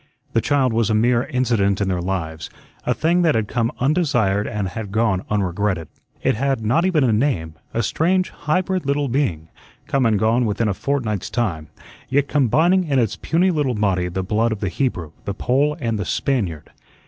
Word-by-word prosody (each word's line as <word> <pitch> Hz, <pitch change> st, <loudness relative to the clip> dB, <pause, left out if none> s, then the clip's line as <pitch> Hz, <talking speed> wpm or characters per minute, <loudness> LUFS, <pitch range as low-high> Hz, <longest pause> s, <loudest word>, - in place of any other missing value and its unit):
The 115 Hz, -, +3 dB
child 130 Hz, -1 st, +1 dB
was 115 Hz, -1 st, +1 dB
a 110 Hz, -, +2 dB
mere 120 Hz, +2 st, +2 dB
incident 115 Hz, -6 st, +1 dB
in 100 Hz, -, 0 dB
their 90 Hz, -2 st, -1 dB
lives, 80 Hz, -4 st, -3 dB, 0.4 s
a -, -, +3 dB
thing 170 Hz, +3 st, +2 dB
that 165 Hz, -3 st, +3 dB
had 110 Hz, -2 st, 0 dB
come 115 Hz, +2 st, 0 dB
undesired 125 Hz, -, +1 dB
and 100 Hz, -3 st, -2 dB
had 105 Hz, +1 st, -6 dB
gone 110 Hz, -3 st, +1 dB
unregretted. 95 Hz, -4 st, -1 dB, 0.3 s
It -, -, +3 dB
had 135 Hz, -1 st, -1 dB
not 160 Hz, +11 st, +2 dB
even 170 Hz, -6 st, +2 dB
a 120 Hz, -4 st, +3 dB
name; 105 Hz, -, 0 dB, 0.2 s
a 115 Hz, -, -1 dB
strange, 180 Hz, -, +1 dB
hybrid 180 Hz, +1 st, -1 dB
little 140 Hz, 0 st, +1 dB
being, 95 Hz, -, -1 dB, 0.4 s
come 135 Hz, -3 st, +1 dB
and 110 Hz, -2 st, +2 dB
gone 115 Hz, +4 st, +2 dB
within 105 Hz, +2 st, 0 dB
a 100 Hz, -, +1 dB
fortnight's 110 Hz, -3 st, -2 dB
time, 90 Hz, -11 st, -2 dB, 0.4 s
yet 140 Hz, +1 st, +2 dB
combining 160 Hz, -, +3 dB
in 140 Hz, -4 st, 0 dB
its 115 Hz, -5 st, +1 dB
puny 180 Hz, +3 st, +1 dB
little 145 Hz, -7 st, 0 dB
body 95 Hz, -4 st, +1 dB
the 95 Hz, +2 st, -3 dB
blood 110 Hz, +4 st, +1 dB
of 110 Hz, -, -3 dB
the 100 Hz, -, -1 dB
Hebrew, 90 Hz, -, -2 dB
the 100 Hz, -, -3 dB
Pole, 140 Hz, +7 st, +1 dB
and 115 Hz, -5 st, -1 dB
the 100 Hz, -, -2 dB
Spaniard. 95 Hz, -, -2 dB
115 Hz, 190 wpm, -21 LUFS, 100-140 Hz, 0.4 s, The